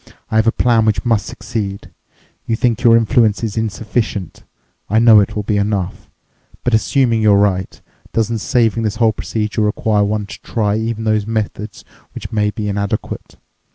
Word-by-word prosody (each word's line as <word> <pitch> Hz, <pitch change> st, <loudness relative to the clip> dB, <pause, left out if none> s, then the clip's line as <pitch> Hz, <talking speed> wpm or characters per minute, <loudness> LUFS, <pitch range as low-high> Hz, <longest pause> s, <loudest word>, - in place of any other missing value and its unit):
"I 110 Hz, -, +2 dB
have 110 Hz, +1 st, +3 dB
a -, -, +5 dB
plan 115 Hz, -2 st, +2 dB
which 105 Hz, -3 st, 0 dB
must 115 Hz, -4 st, +1 dB
succeed. 100 Hz, -3 st, -5 dB, 0.6 s
You 115 Hz, -, +1 dB
think 120 Hz, 0 st, 0 dB
your 115 Hz, -1 st, +6 dB
influence 115 Hz, -1 st, +2 dB
is 110 Hz, -3 st, -2 dB
insufficient. 110 Hz, -3 st, -3 dB, 0.5 s
I 105 Hz, -, +2 dB
know 115 Hz, -1 st, +7 dB
it 100 Hz, -, 0 dB
will 105 Hz, -, -2 dB
be 105 Hz, 0 st, 0 dB
enough. 100 Hz, -2 st, -2 dB, 0.5 s
But 125 Hz, -, 0 dB
assuming 115 Hz, 0 st, +2 dB
you're 105 Hz, -2 st, +5 dB
right, 95 Hz, -2 st, 0 dB, 0.3 s
doesn't 115 Hz, 0 st, 0 dB
saving 115 Hz, 0 st, +1 dB
this 110 Hz, -1 st, -1 dB
whole 110 Hz, -1 st, +2 dB
procedure 110 Hz, +1 st, -3 dB
require 105 Hz, 0 st, +1 dB
one 105 Hz, 0 st, -1 dB
to -, -, -11 dB
try 105 Hz, -3 st, -1 dB
even 110 Hz, 0 st, -2 dB
those 110 Hz, -1 st, 0 dB
methods 110 Hz, -1 st, -4 dB, 0.3 s
which -, -, -7 dB
may 105 Hz, -1 st, +1 dB
be 105 Hz, 0 st, -4 dB
inadequate? 100 Hz, +1 st, -3 dB
110 Hz, 170 wpm, -17 LUFS, 105-115 Hz, 0.6 s, know